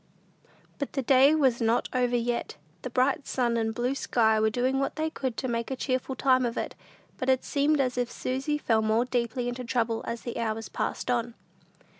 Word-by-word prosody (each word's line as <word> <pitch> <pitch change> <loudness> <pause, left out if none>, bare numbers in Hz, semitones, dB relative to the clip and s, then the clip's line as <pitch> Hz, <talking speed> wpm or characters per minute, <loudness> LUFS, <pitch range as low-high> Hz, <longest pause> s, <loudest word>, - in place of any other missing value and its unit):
But 280 - -3
the 270 - -1
day 270 +4 +6
was 260 -6 +2
not 230 +1 +2
over 245 -1 +1
yet. 240 -5 -1 0.3
The 255 - -5
bright 260 +3 +1
sun 240 -2 0
and 225 -1 0
blue 240 +3 -1
sky 220 -5 +2
were 220 0 +3
doing 255 +4 0
what 275 - -1
they 315 0 -1
could 260 -6 -3
to 260 - -2
make 235 -1 -2
a 265 - -2
cheerful 260 0 -2
time 260 -1 +3
of 235 0 -2
it, - - -3 0.5
but 255 - -1
it 260 -1 +3
seemed 290 +1 +2
as 250 -2 0
if 245 -1 -1
Susy 270 +4 -2
fell 225 -6 +1
more 220 +2 +2
deeply 245 0 -1
into 245 +1 -4
trouble, 230 -2 -1
as 230 - -3
the 240 -1 -5
hours 225 -1 -2
passed - - -2
on. 235 -1 -1
245 Hz, 205 wpm, -27 LUFS, 235-265 Hz, 0.5 s, day